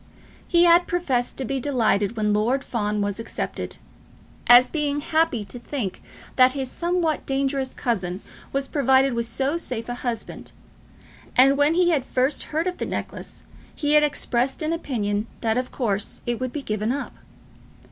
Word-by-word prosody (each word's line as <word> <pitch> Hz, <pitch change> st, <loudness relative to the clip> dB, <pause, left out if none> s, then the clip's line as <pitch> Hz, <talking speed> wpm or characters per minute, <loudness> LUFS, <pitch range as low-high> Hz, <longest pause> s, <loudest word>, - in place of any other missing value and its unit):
He 345 Hz, 0 st, +4 dB
had 345 Hz, 0 st, +5 dB
professed 270 Hz, -9 st, -1 dB
to 265 Hz, -, -3 dB
be 270 Hz, +3 st, -2 dB
delighted 230 Hz, -5 st, +1 dB
when 210 Hz, -1 st, +1 dB
Lord 240 Hz, +6 st, +1 dB
Fawn 210 Hz, -3 st, -2 dB
was 205 Hz, +1 st, -3 dB
accepted, 225 Hz, -, -5 dB, 0.7 s
as 245 Hz, +1 st, +8 dB
being 295 Hz, -2 st, -1 dB
happy 315 Hz, -8 st, +1 dB
to 200 Hz, +5 st, -8 dB
think 240 Hz, -6 st, -4 dB, 0.4 s
that 255 Hz, 0 st, +6 dB
his 265 Hz, -2 st, -3 dB
somewhat 345 Hz, -2 st, -1 dB
dangerous 270 Hz, -1 st, -1 dB
cousin 190 Hz, -5 st, -2 dB, 0.3 s
was 275 Hz, 0 st, -1 dB
provided 265 Hz, -2 st, +3 dB
with 235 Hz, 0 st, -1 dB
so 270 Hz, +7 st, 0 dB
safe 245 Hz, -8 st, -4 dB
a 245 Hz, -, -3 dB
husband; 245 Hz, -2 st, -5 dB, 0.8 s
and, 270 Hz, +2 st, +6 dB
when 290 Hz, +3 st, +3 dB
he 350 Hz, 0 st, +4 dB
had 290 Hz, -6 st, +1 dB
first 260 Hz, +2 st, 0 dB
heard 315 Hz, +2 st, -1 dB
of 365 Hz, -1 st, -3 dB
the -, -, -1 dB
necklace, -, -, -6 dB, 0.3 s
he 295 Hz, -1 st, 0 dB
had 300 Hz, -, +7 dB
expressed 270 Hz, -2 st, 0 dB
an 310 Hz, +1 st, 0 dB
opinion 215 Hz, -9 st, -2 dB
that 225 Hz, -1 st, +1 dB
of 250 Hz, -, -4 dB
course 205 Hz, -6 st, -2 dB
it 240 Hz, -1 st, -1 dB
would 255 Hz, -1 st, -3 dB
be 290 Hz, 0 st, -5 dB
given 215 Hz, 0 st, -1 dB
up. 280 Hz, +2 st, -4 dB
260 Hz, 165 wpm, -24 LUFS, 230-290 Hz, 0.8 s, as